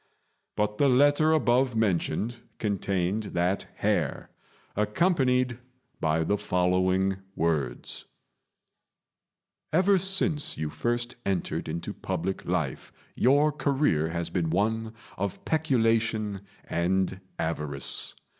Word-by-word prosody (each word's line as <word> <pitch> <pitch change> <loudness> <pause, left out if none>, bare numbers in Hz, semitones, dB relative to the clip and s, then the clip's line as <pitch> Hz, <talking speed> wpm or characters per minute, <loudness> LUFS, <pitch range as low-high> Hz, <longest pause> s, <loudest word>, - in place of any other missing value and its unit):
But 105 0 -1
the 140 - +5
letter 145 +4 +4
above 130 -4 +3
mentioned 110 +2 0 0.2
contained 100 -1 0
that 90 +3 0
hair, - - -1 0.4
accompanied 125 - +2 0.4
by 80 +1 +1
the 105 +5 0
following 95 +1 +1 0.2
words: 75 -6 -2 1.7
"Ever 190 +4 +4
since 190 -5 +1
you 75 -1 -3
first 120 +1 -2
entered 95 -5 -2
into 85 +2 -4
public 95 +4 -3
life 80 -6 -2 0.2
your 145 +4 +4
career 135 - +1
has 85 0 -3
been 85 -4 0
one 110 +5 0 0.2
of 100 -1 -3
peculation 115 -8 +1 0.3
and 95 +2 0 0.2
avarice. 75 -4 -2
105 Hz, 100 wpm, -27 LUFS, 90-130 Hz, 1.7 s, the